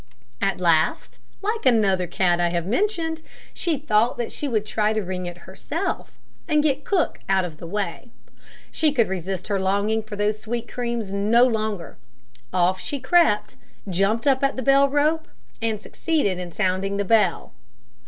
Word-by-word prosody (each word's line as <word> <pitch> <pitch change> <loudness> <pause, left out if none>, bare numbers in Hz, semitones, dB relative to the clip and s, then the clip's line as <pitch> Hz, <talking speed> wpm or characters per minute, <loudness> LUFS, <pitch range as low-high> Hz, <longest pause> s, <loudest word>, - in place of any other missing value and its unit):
At 195 -1 0
last, 165 -3 +1 0.2
like 435 +2 -1
another 200 -8 +3
cat 175 -1 +1
I 175 - +2
have 170 -1 -1
mentioned, 325 - -1 0.3
she 335 -4 -1
thought 235 -4 +2
that 235 - -3
she 290 - -4
would 220 -5 0
try 215 0 +1
to 215 -1 -1
ring 185 -1 -4
it 175 0 -7
herself, 190 +1 -4 0.3
and 300 -3 +3
get 285 -1 +1
cook 375 -5 0
out 190 -1 +3
of 160 -3 -8
the 170 - -8
way; 200 +4 -4 0.6
she 310 -2 +2
could 235 -6 +2
resist 190 0 -4
her 200 -2 0
longing 200 +3 +1
for 215 -1 -8
those 210 +1 -1
sweet 235 +2 -4
creams 235 -5 -3
no 215 +5 +4
longer. 215 -7 -2 0.5
Off 185 +1 +2
she 285 - -4
crept, 330 -8 +2 0.3
jumped 195 +5 +1
up 270 -1 +3
at 275 - +2
the 260 - -3
bell 275 +2 +5
rope, 305 +3 +1 0.3
and 225 -2 -1
succeeded 215 - -1
in 180 -1 -6
sounding 195 +1 -1
the 200 - -1
bell. 210 -5 +2
215 Hz, 170 wpm, -23 LUFS, 190-265 Hz, 0.6 s, bell